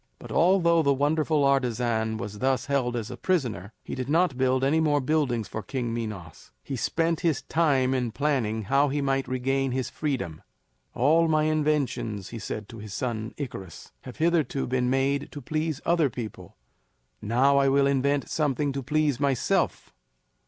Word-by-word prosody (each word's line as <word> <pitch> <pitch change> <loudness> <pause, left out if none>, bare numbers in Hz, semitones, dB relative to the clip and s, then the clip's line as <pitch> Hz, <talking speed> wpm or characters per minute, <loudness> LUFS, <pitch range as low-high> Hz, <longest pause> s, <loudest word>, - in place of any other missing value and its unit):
But - - -11
although 170 -2 +4
the 140 -2 +2
wonderful 150 +1 +1
artisan 120 -5 +1
was 105 0 -6
thus 130 +1 +1
held 130 -4 0
as 115 0 -4
a 125 - -7
prisoner, 120 - -1
he - - -7
did 130 0 -4
not 165 -2 +2
build 130 0 +1
any 145 +4 +3
more 150 -2 +2
buildings 130 -6 0
for 110 - -5
King 120 +2 -3
Minos; 105 -8 -6
he 135 - -4
spent 165 +6 0
his 165 -4 0
time 140 -6 +2
in 125 -3 -1
planning 115 -6 0
how 140 +6 +2
he 145 +2 -1
might 135 -1 0
regain 130 +1 0
his 130 -1 -2
freedom. 125 - -3 0.5
"All 160 +6 +4
my 155 -1 +2
inventions," 150 -10 0
he 115 - -7
said 105 0 -5
to 115 - -10
his 105 -2 -8
son 110 -2 -3
Icarus, 115 - -7
"have 125 - -10
hitherto 160 -4 +1
been 125 0 0
made 135 +2 0
to 145 - -6
please 155 +1 -2
other 165 -4 +3
people; 115 -3 -8 0.7
now 130 +6 +3
I 135 0 +3
will 140 +1 +3
invent 140 +1 +1
something 145 -2 0
to 135 - -3
please 150 0 0
myself." 140 -4 0
135 Hz, 170 wpm, -26 LUFS, 120-150 Hz, 0.7 s, although